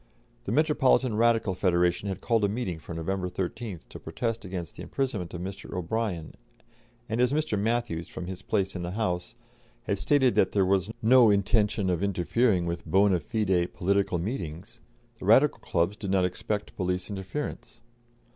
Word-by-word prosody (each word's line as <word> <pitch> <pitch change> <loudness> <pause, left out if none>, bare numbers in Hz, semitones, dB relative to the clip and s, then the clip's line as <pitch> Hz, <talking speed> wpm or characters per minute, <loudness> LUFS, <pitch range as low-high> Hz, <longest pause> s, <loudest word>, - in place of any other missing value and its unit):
The - - -3
Metropolitan 135 -6 +3
Radical 115 -3 +3
Federation 90 +1 +1
had 95 - -4
called 115 -3 +1
a - - +4
meeting 100 -6 -3
for 80 +2 -8
November 90 +3 -2
13th 95 +1 -5
to - - -9
protest 115 -2 -3
against 90 -4 -6
the - - -9
imprisonment 120 -11 -3
of 85 - -5
Mr. 95 +2 -7
O'Brien, 90 -2 -2 0.7
and 115 +1 -1
as 125 0 +3
Mr. 150 -6 0
Matthews, 110 -5 -1
from 90 - -7
his 95 0 -6
place 100 -3 -1
in 90 - -3
the 85 +1 -4
House, 90 -5 -2 0.5
had 100 - -1
stated 135 -4 +3
that 95 - +2
there 100 -2 +3
was 95 +1 +1
no 120 0 +7
intention 105 0 +2
of 85 - -1
interfering 100 +1 +1
with 85 0 -4
bonâ 95 -2 +4
fide 95 -5 0
political 100 0 +1
meetings, 85 - -5 0.4
the - - -7
Radical 130 +8 +5
clubs 85 +3 0
did 100 -2 -6
not 95 -1 +3
expect 105 +3 -3
police 90 -1 -2
interference. 100 +9 -5
100 Hz, 165 wpm, -27 LUFS, 90-115 Hz, 0.7 s, no